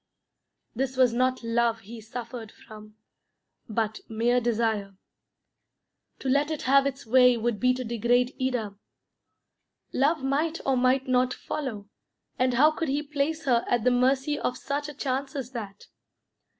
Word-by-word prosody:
This 260 +1 -2
was 255 -2 +4
not 255 +1 +1
love 230 0 +1
he 225 +3 -10
suffered 230 0 -7
from, 215 0 -14 0.7
but 220 0 -1
mere 235 +3 +1
desire. 220 -4 -1 1.2
To - - -6
let 285 +3 +2
it 310 -2 -3
have 275 +1 +4
its 275 -1 -5
way 250 +1 +5
would 230 -2 -1
be 255 0 +3
to 255 - -4
degrade 245 +2 +1
Ida. 245 -6 -1 1.2
Love 285 +2 +1
might 310 +5 0
or 270 - +2
might 255 +2 +2
not 255 0 +2
follow, 225 -9 -5 0.5
and 255 -1 +2
how 300 +5 +6
could 320 -1 -3
he 285 +2 0
place 300 +2 -2
her 240 -3 +3
at 240 -2 +1
the 250 - +4
mercy 265 +4 +2
of 250 - -2
such 290 +1 -3
a 295 - -9
chance 270 +1 -3
as 260 -3 -4
that? 205 -5 -7
250 Hz, 150 wpm, -27 LUFS, 230-275 Hz, 1.2 s, how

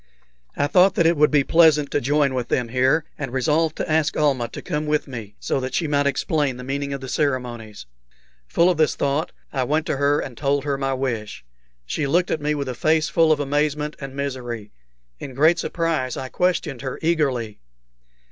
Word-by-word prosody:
I 145 - +2
thought 180 +5 +4
that 170 - +2
it 170 +1 +4
would 150 0 +4
be 145 -2 +3
pleasant 155 -2 +4
to 145 - 0
join 140 +1 +2
with 125 -2 -2
them 125 -2 -1
here, 130 +6 +2
and 135 -4 -4
resolved 150 +5 +1
to - - -3
ask 155 -1 +1
Almah 135 -6 +1
to - - -8
come 155 -4 -3
with 150 0 0
me, 110 -6 -8
so - - -1
that 130 0 -4
she 160 - 0
might 145 -1 +1
explain 140 -1 0
the 125 - -8
meaning 140 +2 -3
of 140 -1 -4
the 130 - -6
ceremonies. 125 - -2 0.6
Full 170 - +3
of 175 - -2
this 155 -1 +2
thought, 140 +3 -1 0.2
I 135 -3 0
went 150 +5 0
to - - -1
her 145 +1 +2
and 125 - -6
told 140 +1 0
her 145 -1 -1
my 135 -1 -1
wish. 115 - -4 0.4
She 145 - -2
looked 175 +5 +1
at 155 - -1
me 150 +1 0
with 140 -2 -3
a - - -2
face 155 +4 +1
full 165 0 +3
of 155 - +3
amazement 150 +1 -1
and 135 -1 -7
misery. 125 -6 -5 0.5
In 135 -3 -8
great 155 +5 +4
surprise 160 -7 -1
I 130 - -5
questioned 175 -7 -1
her 130 -1 -4
eagerly. 135 - 0
140 Hz, 205 wpm, -22 LUFS, 130-155 Hz, 0.6 s, thought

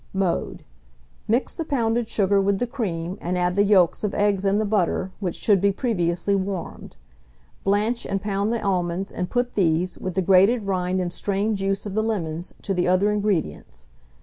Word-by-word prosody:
Mode. 190 -3 -1 0.6
Mix 235 +5 0
the 330 - -3
pounded 240 -6 0
sugar 200 -2 +2
with 195 0 +1
the 245 - 0
cream, 195 -8 -4
and 180 +1 -2
add 180 0 0
the 200 - +4
yolks 195 -4 +3
of 210 - -1
eggs 200 -1 +1
and 200 +1 +2
the 215 - 0
butter, 190 -2 0
which 185 -5 -3
should 200 -4 +2
be 200 0 +3
previously 190 -4 0
warmed. 195 -2 -4 0.7
Blanch 210 +4 0
and 195 - -1
pound 200 +1 -1
the 235 - -2
almonds, 185 -1 -1
and 180 0 -4
put 245 0 -1
these, 175 -1 +1
with 185 -2 -4
the 190 - +1
grated 195 +6 +4
rind 185 -1 -1
and 175 -1 -2
strained 205 +1 -1
juice 195 +1 -1
of 205 - -5
the 215 - +1
lemons, 175 -6 -2
to 195 - -1
the 180 -1 0
other 185 +3 +3
ingredients. 200 - -2
195 Hz, 185 wpm, -23 LUFS, 180-210 Hz, 0.7 s, the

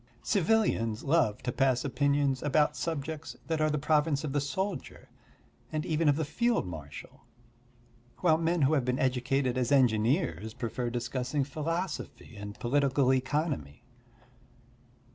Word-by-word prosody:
Civilians 170 - +1
love 140 -8 +1
to 125 - -1
pass 130 0 +1
opinions 140 0 +1
about 150 +1 +2
subjects 160 -1 -4
that 160 -1 -1
are 155 - +3
the 150 - 0
province 150 0 +1
of 145 -3 -3
the 145 - +1
soldier 180 +4 -4 0.6
and 155 -1 -2
even 155 -1 +2
of 145 - +4
the 160 +1 -1
field 235 - +1
marshal; 75 -5 -9 1.0
while 160 -3 +3
men 165 -1 +1
who 135 +3 +3
have 140 -4 +2
been 125 +1 0
educated 130 0 0
as 125 +2 -1
engineers 110 - +2
prefer 120 0 -3
discussing 125 +4 -2
philosophy 160 -1 -4
and 105 0 -8
political 135 +1 +2
economy. 130 - -2
140 Hz, 135 wpm, -30 LUFS, 125-155 Hz, 1.0 s, of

